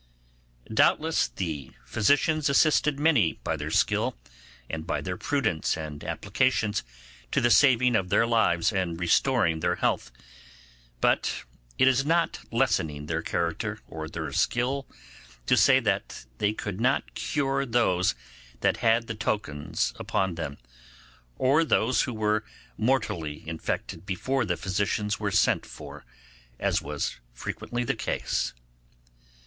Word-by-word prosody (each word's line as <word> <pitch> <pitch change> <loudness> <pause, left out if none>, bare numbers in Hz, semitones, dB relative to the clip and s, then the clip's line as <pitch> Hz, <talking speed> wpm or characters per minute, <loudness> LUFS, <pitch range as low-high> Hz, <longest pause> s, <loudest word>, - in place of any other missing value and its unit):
Doubtless, 160 +8 +3
the 75 -7 -5
physicians 145 +6 +2
assisted 150 0 +3
many 145 - +3
by - - -1
their - - -4
skill, - - +1 0.5
and 80 +2 -5
by - - 0
their 90 -1 -4
prudence 110 - 0
and 75 -2 -7
applications, 110 -5 0 0.5
to - - +2
the 120 - +3
saving 125 -3 +5
of 95 -3 0
their 115 - +4
lives 110 -8 +2
and 90 -4 -1
restoring 90 -1 +2
their 90 +2 +1
health. - - -1 0.9
But - - +1 0.3
it 130 - +5
is 130 0 +4
not 165 +3 +1
lessening 75 -2 0
their 80 +1 -2
character 85 0 -2
or 80 -1 -6
their 80 -3 -5
skill, 130 - 0 0.6
to - - +4
say 130 -1 +6
they 100 - -2
could 105 -1 -5
not 130 +3 +1
cure 140 -1 -1
those 115 - +2 0.5
that - - +2
had 115 0 +2
the 115 - -4
tokens 105 -9 -2
upon 95 -2 0
them, 80 -4 -5 0.8
or 140 +5 +3
those 130 -5 +2
who 125 - -2
were 105 0 +1 0.3
mortally 105 - -1
infected 80 +2 -4
before 130 +6 -1
the 90 -4 -1
physicians 100 +1 -1
were - - -1
sent - - +2
for, - - -11 0.5
as - - +1
was - - -3 0.2
frequently 120 - -4
the - - 0
case. - - -2
105 Hz, 130 wpm, -27 LUFS, 85-130 Hz, 0.9 s, say